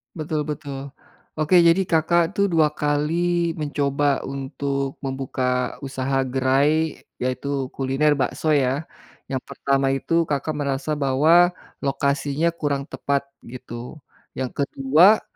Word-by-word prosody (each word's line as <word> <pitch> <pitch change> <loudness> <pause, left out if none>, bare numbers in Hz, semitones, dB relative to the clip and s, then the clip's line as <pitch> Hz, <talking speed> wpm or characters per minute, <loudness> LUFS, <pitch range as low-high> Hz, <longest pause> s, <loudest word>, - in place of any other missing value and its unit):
Betul 155 -1 -2
betul. 145 -2 -5 0.6
Oke 155 +4 +4
jadi 170 +2 +5
Kakak 170 +1 +2
tuh 200 0 +2
2 155 -3 +3
kali 165 +4 0
mencoba 145 -1 0
untuk 140 0 -3
membuka 130 -2 -2
usaha 135 0 -1
gerai 135 +5 +1 0.2
yaitu 130 +1 -2
kuliner 135 +3 +2
bakso 135 +4 -1
ya? 135 +2 +1 0.4
Yang 130 -1 -2
pertama 135 0 0
itu 165 +5 +1
Kakak 145 +1 -1
merasa 140 +1 -1
bahwa 155 +6 +4 0.3
lokasinya 140 +3 0
kurang 145 -4 -1
tepat 140 0 -1 0.2
gitu. 120 +3 -9 0.3
Yang 130 -1 -3
ke-2 155 +11 +4
140 Hz, 115 wpm, -23 LUFS, 135-155 Hz, 0.6 s, jadi